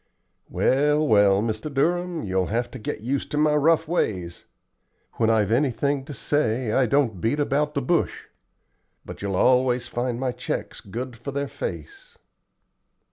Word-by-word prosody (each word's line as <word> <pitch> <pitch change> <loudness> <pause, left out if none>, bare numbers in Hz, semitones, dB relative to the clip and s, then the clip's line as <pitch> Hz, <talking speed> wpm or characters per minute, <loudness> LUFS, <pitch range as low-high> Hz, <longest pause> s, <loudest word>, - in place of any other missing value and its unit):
"Well, 150 +3 +2
well, 100 -2 +4
Mr. 115 +6 -3
Durham, 175 +4 0
you'll 95 -1 0
have 120 +2 -2
to - - -8
get 105 - -5
used 130 +4 -2
to 150 - -3
my 150 0 +3
rough 160 +2 +3
ways. 90 - -2 0.7
When 115 -1 +2
I've 110 -2 +2
anything 140 +2 +1
to 145 - -7
say, 125 -6 0
I 130 +2 +3
don't 115 -8 +1
beat 135 +7 0
about 150 +1 0
the 140 - 0
bush. 170 +6 0 0.8
But - - -9
you'll 100 -1 -2
always 125 +2 +3
find 120 0 -2
my 130 -1 -1
checks - - -5
good 120 +5 -6
for 120 - -8
their 140 +1 -2
face." 470 - -7
130 Hz, 155 wpm, -24 LUFS, 110-150 Hz, 0.8 s, well